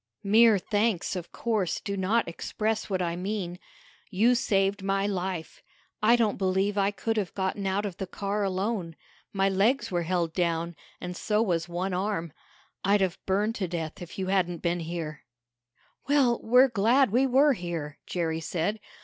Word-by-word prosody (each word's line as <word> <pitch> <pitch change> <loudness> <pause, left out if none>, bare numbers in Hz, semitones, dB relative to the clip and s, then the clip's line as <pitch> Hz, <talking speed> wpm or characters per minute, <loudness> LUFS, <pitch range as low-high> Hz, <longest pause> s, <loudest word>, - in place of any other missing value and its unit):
"Mere 220 +1 +6
thanks, 205 -1 0
of 175 -2 -6
course, 210 -7 -1
do 200 - -4
not 200 +5 +1
express 215 +6 -2
what 185 -2 0
I 170 -1 -1
mean. 180 -1 -4 0.5
You 220 +5 +3
saved 200 -4 +1
my 195 0 0
life. 185 -4 -3 0.4
I 225 +3 +6
don't 225 -5 +1
believe 190 +1 +1
I 200 -1 +2
could 225 +2 -2
have 195 -5 -2
gotten 195 +1 -1
out 195 +2 0
of 190 -4 -5
the 190 - -4
car 205 +2 -2
alone. 190 -3 -2 0.4
My 195 -1 +1
legs 200 +8 +2
were 175 -1 0
held 170 -1 -1
down, 170 -1 -1 0.2
and 180 0 -6
so 210 +4 +1
was 175 -4 -1
one 180 +2 -2
arm. 180 -4 -2 0.5
I'd 200 +1 +3
have 185 -2 -1
burned 205 +4 +1
to 190 - -1
death 165 -2 -5
if 175 - -9
you 190 - -2
hadn't 180 -3 0
been 175 0 0
here." 160 -3 -5 0.8
"Well, 275 -5 +3
we're 250 +4 +6
glad 235 +3 +3
we 255 +4 +3
were 275 +3 +5
here," 170 - -5
Jerry 165 -2 -1
said. 175 +6 -2
195 Hz, 170 wpm, -27 LUFS, 175-215 Hz, 0.8 s, Mere